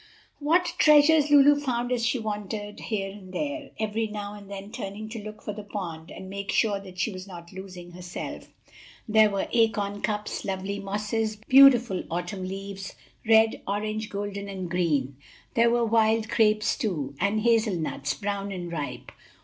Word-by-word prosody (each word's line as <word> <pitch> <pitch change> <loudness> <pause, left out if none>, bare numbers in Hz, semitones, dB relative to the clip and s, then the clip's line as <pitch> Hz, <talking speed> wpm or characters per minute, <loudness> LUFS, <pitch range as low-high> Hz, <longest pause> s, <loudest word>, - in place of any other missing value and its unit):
What 345 +4 +2
treasures 300 0 +6
Lulu 290 0 +7
found 245 -3 -1
as 245 -2 0
she 235 +3 +2
wandered 210 -1 -4
here 195 -3 -3
and 195 -2 -12
there, 290 +7 -3
every 220 +1 -1
now 205 -1 -6
and 205 -1 -11
then 200 +1 -7
turning 210 +2 -6
to 225 -1 -6
look 215 0 -9
for 210 - -4
the 210 - -7
pond, 175 -6 -6
and 190 - -9
make 200 +1 -4
sure 205 -3 +2
that 190 -2 -12
she 220 - 0
was 185 +1 -8
not 170 -2 -10
losing 185 -2 -9
herself, 175 0 -7 0.6
there 215 -1 +5
were 200 -1 -2
acorn 205 -3 +1
cups, 210 -1 -2
lovely 195 +1 -3
mosses, 210 +2 -2
beautiful 250 -7 +7
autumn 180 +3 -3
leaves 195 0 -6 0.3
red, 220 0 +5
orange, 215 +2 -2
golden 200 0 -4
and 185 -3 -5
green; 145 -7 0 0.4
there 235 0 +4
were 235 0 +2
wild 220 0 +3
grapes 215 -1 +3
too, 150 -10 -2
and 200 +4 +1
hazel 225 -3 +3
nuts, 155 -4 -2
brown 200 -1 -3
and 175 -3 -5
ripe. 150 -4 -5
205 Hz, 165 wpm, -26 LUFS, 190-225 Hz, 0.6 s, Lulu